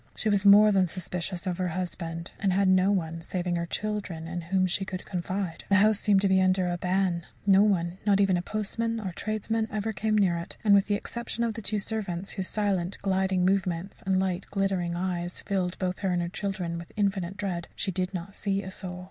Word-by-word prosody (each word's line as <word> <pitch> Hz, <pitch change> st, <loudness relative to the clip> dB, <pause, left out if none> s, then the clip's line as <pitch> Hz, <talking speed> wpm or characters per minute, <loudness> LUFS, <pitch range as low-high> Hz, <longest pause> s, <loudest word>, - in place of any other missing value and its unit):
She 215 Hz, -, -1 dB
was 200 Hz, -1 st, +3 dB
more 210 Hz, +1 st, +8 dB
than 190 Hz, -2 st, +3 dB
suspicious 180 Hz, +1 st, -4 dB
of 180 Hz, -1 st, -2 dB
her 185 Hz, -, +1 dB
husband, 170 Hz, -1 st, -4 dB
and 195 Hz, -2 st, +2 dB
had 195 Hz, +1 st, +3 dB
no 185 Hz, +1 st, +4 dB
one 165 Hz, -4 st, -1 dB
saving 175 Hz, +1 st, -2 dB
her 170 Hz, 0 st, -2 dB
children 195 Hz, -6 st, -3 dB
in 175 Hz, +1 st, -4 dB
whom 185 Hz, +3 st, +1 dB
she 185 Hz, +2 st, 0 dB
could 185 Hz, -1 st, -6 dB
confide. 180 Hz, -1 st, -3 dB
The 200 Hz, -, +5 dB
house 210 Hz, +1 st, +5 dB
seemed 200 Hz, -2 st, +3 dB
to 200 Hz, -, +3 dB
be 190 Hz, 0 st, +4 dB
under 185 Hz, -1 st, +3 dB
a 175 Hz, 0 st, -1 dB
ban; 180 Hz, -2 st, 0 dB, 0.2 s
no 195 Hz, -1 st, +6 dB
one, 185 Hz, -3 st, +1 dB
not 200 Hz, -1 st, +3 dB
even 195 Hz, -2 st, +4 dB
a 175 Hz, -, 0 dB
postman 225 Hz, +4 st, -2 dB
or 195 Hz, -4 st, -4 dB
tradesman, 215 Hz, +3 st, -2 dB
ever 215 Hz, +1 st, -2 dB
came 215 Hz, +2 st, 0 dB
near 180 Hz, -4 st, +3 dB
it, 170 Hz, -, -7 dB
and 210 Hz, -2 st, +5 dB
with 200 Hz, 0 st, +5 dB
the 205 Hz, -, +2 dB
exception 235 Hz, +2 st, -4 dB
of 230 Hz, -1 st, 0 dB
the 225 Hz, -, -6 dB
two 210 Hz, +1 st, -1 dB
servants, 195 Hz, -3 st, -3 dB
whose 190 Hz, -1 st, -3 dB
silent, 195 Hz, -4 st, -1 dB
gliding 190 Hz, -1 st, +1 dB
movements 190 Hz, -1 st, 0 dB
and 190 Hz, -1 st, +2 dB
light 190 Hz, -1 st, -1 dB
glittering 190 Hz, -3 st, 0 dB
eyes 175 Hz, -1 st, -3 dB
filled 185 Hz, -2 st, -1 dB
both 185 Hz, -1 st, -2 dB
her 195 Hz, -, 0 dB
and 175 Hz, -1 st, +1 dB
her 170 Hz, -, -3 dB
children 180 Hz, -3 st, -3 dB
with 170 Hz, -, -10 dB
infinite 195 Hz, -3 st, -1 dB
dread, 180 Hz, -4 st, -3 dB
she 195 Hz, -, -2 dB
did 185 Hz, 0 st, -2 dB
not 185 Hz, +1 st, -6 dB
see 200 Hz, 0 st, -1 dB
a 190 Hz, -, -7 dB
soul. 180 Hz, -1 st, -5 dB
190 Hz, 225 wpm, -28 LUFS, 180-200 Hz, 0.2 s, more